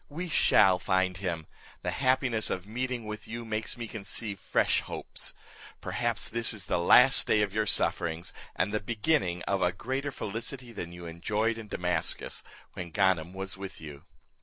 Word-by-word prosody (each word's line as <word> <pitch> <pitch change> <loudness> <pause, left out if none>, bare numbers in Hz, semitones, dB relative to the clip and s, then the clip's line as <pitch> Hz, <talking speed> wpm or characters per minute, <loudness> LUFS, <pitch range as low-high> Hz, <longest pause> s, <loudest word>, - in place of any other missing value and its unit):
We 170 +5 -5
shall 95 - +5
find 95 -1 +1
him; 85 -4 -3 0.4
the 90 - -1
happiness 130 -2 +2
of 90 0 -3
meeting 125 +2 -3
with 105 0 -6
you 120 +1 -5
makes 110 +2 -2
me 120 -1 -5
conceive 105 -1 -4
fresh - - +2
hopes. - - -6 0.4
Perhaps - - -1
this 115 0 +2
is 100 - -4
the - - 0
last 125 +9 +7
day 105 -1 +4
of 100 -2 -2
your 110 0 +1
sufferings, 85 -3 +1 0.2
and 100 +3 0
the 105 - +1
beginning 105 - 0
of 100 -1 0
a 90 - +3
greater 130 +9 -3
felicity 120 +3 -4
than 85 -6 -6
you 85 0 -9
enjoyed 105 +7 -1
in 110 - -8
Damascus, 90 -3 -1 0.3
when 90 -1 -6
Ganem 90 -2 +2
was 95 +1 -4
with 95 -1 -7
you." 75 -3 -10
105 Hz, 170 wpm, -29 LUFS, 90-115 Hz, 0.4 s, last